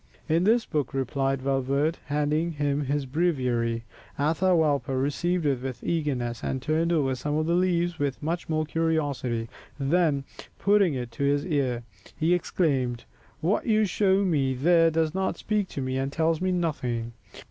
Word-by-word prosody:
"In 165 +2 +2
this 225 +2 +3
book," 145 -5 -2
replied 135 0 -1
Valverde, 140 +4 0
handing 150 +3 0
him 145 -1 -1
his 140 +1 -1
breviary. 125 -7 0 0.3
Atahualpa 155 -3 +2
received 165 +5 0
it 135 -4 +1
with 130 -2 -6
eagerness 130 -8 -2
and 130 - -1
turned 160 +5 0
over 140 -6 +2
some 145 +4 -2
of 155 0 +1
the 170 - +1
leaves 175 -1 +1
with 140 -2 -1
much 170 +3 -2 0.2
curiosity, 145 -8 -1 0.3
then, 145 0 +2 0.3
putting 200 -6 +3
it 120 -2 -4
to 115 - -4
his 145 0 +2
ear, 135 -8 0 0.3
he 165 +3 +2
exclaimed, 135 -9 0 0.4
"What 180 +9 0
you 215 -1 +4
show 195 0 +2
me 140 -7 +1
there 165 +5 +4
does 160 -1 0
not 190 0 -1
speak 210 -2 -1
to 140 - -5
me, 130 0 -2
and 135 +1 -2
tells 160 +2 +1
me 185 0 +1
nothing." 125 -10 -2
150 Hz, 160 wpm, -26 LUFS, 135-170 Hz, 0.4 s, you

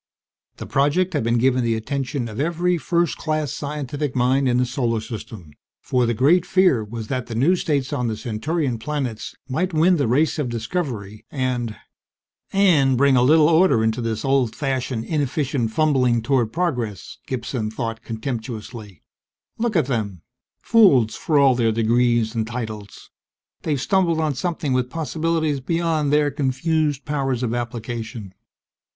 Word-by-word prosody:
The - - -7
project 150 +7 +1
had 145 - 0
been 115 +1 +1
given 130 +1 +2
the 115 -1 +1
attention 135 +2 -3
of 110 +1 -7
every 170 +3 0
first 170 0 0
class 155 -3 -1
scientific 145 -1 -4
mind 130 +2 +2
in 120 - +2
the 125 - +2
Solar 120 -2 -1
System; 110 -7 -8 0.3
for 125 -2 0
the 120 - 0
great 155 +9 +4
fear 180 - +3
was 110 +1 -7
that 130 -2 -2
the 115 - -6
new 145 +11 +3
states 145 -5 -1
on 125 -4 -1
the 110 -1 -2
Centaurian 130 +3 -2
planets 130 -4 -4
might 165 +6 -1
win 170 +3 +4
the 140 - +1
race 150 +7 +2
of 140 -5 -1
discovery 115 - -4
and... 125 -5 -2 0.8
And 155 -10 +4
bring 140 +1 +4
a 125 - +4
little 150 +4 +5
order 160 -8 +4
into 110 +2 0
this 115 0 -3
old 135 -4 +1
fashioned, 130 -5 -2
inefficient 140 -5 -1
fumbling 125 -4 +2
toward 120 -3 +1
progress, 125 - -3
Gibson 120 -3 -3
thought 115 0 -4
contemptuously. 110 - -6 0.6
_Look 230 -2 -1
at 160 - +3
them 105 - -3 0.4
fools 140 - +5
for 155 - 0
all 140 -2 +6
their 115 -2 +1
degrees 115 0 +2
and 110 -2 -2
titles! 110 -4 -7 0.5
They've 150 -4 -1
stumbled 170 +1 +1
on 155 -2 0
something 155 -1 -2
with 125 -1 0
possibilities 160 -1 -1
beyond 160 0 0
their 150 -1 +3
confused 145 +1 0
powers 135 -4 -1
of 120 -2 -1
application. 115 -3 -5
130 Hz, 155 wpm, -22 LUFS, 115-150 Hz, 0.8 s, all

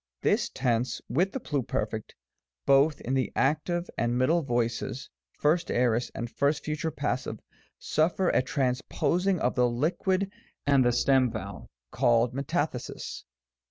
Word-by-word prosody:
t - - +3
This - - +1
tense 120 -1 0
with 175 +10 +1
the 265 - -3
pluperfect, 115 - -3 0.5
both 140 +2 +4
in 130 - -3
the 130 -1 0
active 175 +3 +1
and 120 +1 +1
middle 160 +7 +3
voices, 120 -4 -2 0.3
1st 165 +4 +2
aorist 120 -1 +1
and 120 - -3
1st 140 +5 0
future 155 +1 -2
passive, 140 -3 -3 0.4
suffer 170 +4 +1
a - - +3
transposing 145 +8 0
of 125 - +1
the 125 -1 +3
liquid 185 +9 0 0.3
and 140 -2 +4
the 120 - +3
stem 130 +1 +3
vowel 100 -3 -7 0.2
(called 120 +1 +3
Metathesis). 140 -1 -3
135 Hz, 135 wpm, -28 LUFS, 120-160 Hz, 0.5 s, both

